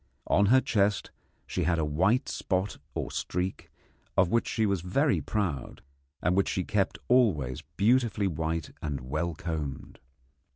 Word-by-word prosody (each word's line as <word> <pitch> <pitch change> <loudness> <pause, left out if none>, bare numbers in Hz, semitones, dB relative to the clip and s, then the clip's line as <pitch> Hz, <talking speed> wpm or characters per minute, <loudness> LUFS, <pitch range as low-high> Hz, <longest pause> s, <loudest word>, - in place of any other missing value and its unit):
On 100 0 +3
her 130 +4 +6
chest 100 -3 +1 0.3
she - - -2
had 85 -1 +2
a 80 - +1
white 95 - +2
spot 95 +1 -2 0.2
or - - -3
streak, 90 +1 -3 0.5
of 90 -1 +5
which 115 - +2
she 110 -1 +1
was 100 -4 +1
very 135 - +1
proud, 90 - -3 0.4
and 90 +2 +2
which 100 - +2
she 95 - -1
kept 100 0 0
always 80 - +3 0.2
beautifully 115 -1 +3
white 80 -2 -2
and 70 -4 -3
well 80 +6 -2
combed. 75 -5 -5
90 Hz, 150 wpm, -29 LUFS, 80-105 Hz, 0.5 s, her